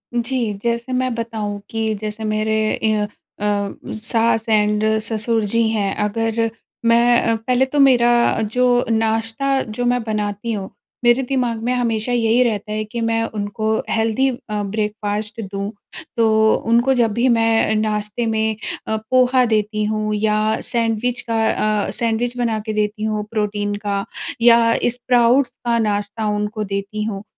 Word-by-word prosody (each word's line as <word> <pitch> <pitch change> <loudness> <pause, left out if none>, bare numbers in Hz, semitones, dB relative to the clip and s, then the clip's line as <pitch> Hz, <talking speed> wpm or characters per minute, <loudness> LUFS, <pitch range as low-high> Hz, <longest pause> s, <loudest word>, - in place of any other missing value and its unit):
जी 235 -2 -1
जैसे 235 +2 -1
मैं 255 -1 0
बताऊँ 220 -3 -4
कि 220 -1 -1
जैसे 215 +1 -5
मेरे 215 0 0 0.3
ई 220 - +3
अ, 210 0 0 0.4
सास, 215 +2 -1
एंड 210 0 +2 0.2
ससुर 225 0 -1
जी 230 -1 +2
हैं 205 -3 0
अगर 225 +1 0 0.4
मैं 235 -1 +4
पहले 250 +3 +1
तो 285 +2 -2
मेरा 240 -4 +4
जो 250 0 +3 0.2
नाश्ता 225 +4 0 0.2
जो 245 - -1
मैं 245 0 +2
बनाती 210 0 -3
हूँ 195 -2 -4 0.3
मेरे 240 +2 +4
दिमाग 245 -4 0
में 250 +1 0
हमेशा 235 -1 0
यही 240 +1 +3
रहता 210 -2 -2
है 215 0 -1
कि 230 +2 -5
मैं 225 0 +1
उनको 215 0 -3 0.2
हेल्दी 225 +4 +1 0.2
अ, 210 -1 -1
ब्रेकफ़ास्ट 210 +1 -3
दूँ। 200 +1 -4 0.5
तो 220 -1 +4
उनको 240 +3 +4
जब 235 -3 +2
भी 240 +3 +1
मैं 225 -1 +3
नाश्ते 215 +1 -1
में 220 -1 0 0.3
अ, 220 - 0 0.2
पोहा 255 0 +4
देती 215 -1 0
हूँ 215 0 -1
या 210 0 +1 0.3
सैंडविच 235 +1 -1
का 225 -1 +1 0.4
अ, - - -4
सैंडविच 235 +1 -1
बना 230 -3 0
के 215 - -3
देती 210 0 -1
हूँ 215 -1 -1
प्रोटीन 205 -1 -1
का 200 -1 -1 0.4
या 230 -1 +6 0.2
स्प्राउट्स 245 +1 +2
का 235 -1 +2
नाश्ता 210 0 -1
उनको 210 +1 -2
देती 200 +1 -3
हूँ 210 -2 -4
225 Hz, 150 wpm, -20 LUFS, 215-235 Hz, 0.5 s, या